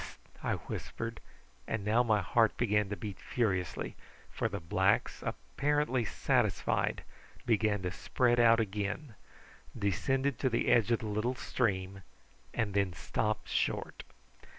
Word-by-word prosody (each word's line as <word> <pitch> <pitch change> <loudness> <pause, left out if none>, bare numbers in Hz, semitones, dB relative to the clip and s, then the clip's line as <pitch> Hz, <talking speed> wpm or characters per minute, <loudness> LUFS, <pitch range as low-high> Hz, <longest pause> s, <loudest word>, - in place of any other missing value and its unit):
"Hist!" - - -9 0.2
I - - 0
whispered; - - -5 0.5
and 110 -2 -2
now 110 +3 +4
my 110 -4 +2
heart 110 +6 +2
began 105 -3 +2
to 105 - -2
beat 105 -3 -6
furiously, 95 -9 -1 0.4
for - - -1
the 100 - -4
blacks, 85 -1 +1
apparently 145 -4 0
satisfied, - - +1 0.4
began 105 -3 +2
to 90 - -1
spread 120 +4 +1
out 115 -1 +6
again, 105 +5 -2 0.6
descended 130 +6 0
to 130 - +2
the 115 -1 +1
edge 115 -2 +4
of 115 - +2
the - - -5
little 110 +4 -1
stream, 95 -6 -1 0.5
and 105 -4 -1
then 100 -3 +1
stopped 105 +7 -2
short. - - -1
110 Hz, 135 wpm, -32 LUFS, 100-120 Hz, 0.6 s, out